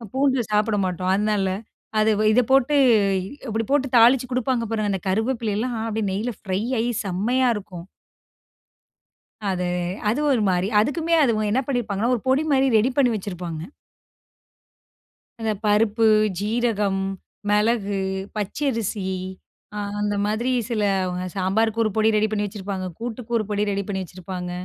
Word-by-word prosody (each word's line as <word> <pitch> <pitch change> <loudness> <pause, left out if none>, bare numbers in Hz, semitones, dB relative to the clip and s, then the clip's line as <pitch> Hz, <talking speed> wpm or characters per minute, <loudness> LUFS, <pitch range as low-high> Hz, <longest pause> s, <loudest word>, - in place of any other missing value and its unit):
பூண்டு 265 -1 +2
சாப்பிட 210 0 +2
மாட்டோம். 185 +1 -1
அதனால 205 -1 +1 0.5
அது 215 +1 +3
வ 215 - +1
இத 240 +3 +5
போட்டு, 270 +2 +4 0.4
இ - - -3 0.3
இப்பிடி 225 +1 -1
போட்டு 275 -1 +2
தாளிச்சு 240 +2 +6
குடுப்பாங்க. 255 -1 0
பாருங்க, 215 -2 0
இந்த 195 - -1
கருவேப்பிலையெல்லாம் 225 +2 -1
அப்பிடியே 220 -2 -2
நெய்ல 210 +6 -2
ஃப்ரை 190 -1 -2 0.2
ஆயி 230 +2 0 0.2
செம்மையா 230 +8 +1
இருக்கும்! 185 -4 -8 1.6
அது, 180 -2 -1 0.4
அது 235 - 0
ஒரு 245 -5 +2
மாரி, 180 +1 +1
அதுக்குமே 315 +9 0
அது 235 -4 +3 0.2
என்ன 260 +5 +2
பண்ணிருப்பாங்கன்னா, 235 -3 -1
1 230 - -5
பொடி 265 +4 +3
மாரி 270 0 +3
ரெடி 220 +4 +3
பண்ணி 250 -4 +4
வச்சிருப்பாங்க. 180 -5 -5 1.8
அந்த 220 -1 0
பருப்பு, 215 +2 +3 0.3
ஜீரகம், 210 -2 0 0.5
மிளகு, 210 -1 +1 0.4
பச்சரிசி 220 -2 -2 0.7
அ - - -2 0.2
அந்த 205 0 0
மாதிரி 220 +5 0 0.2
சிலவுங்க 195 -5 0
சாம்பார் 200 +4 +1
1 215 - +1
பொடி 220 0 +3
ரெடி 215 +1 +3
பண்ணி 210 -1 -1
வச்சிருப்பாங்க. 190 -1 -5
கூட்டுக்கு 235 0 -4
1 220 - 0
பொடி 205 0 0
ரெடி 200 0 -1
பண்ணி 190 -2 -2
வச்சிருப்பாங்க. 180 0 -7
215 Hz, 140 wpm, -23 LUFS, 195-240 Hz, 1.8 s, தாளிச்சு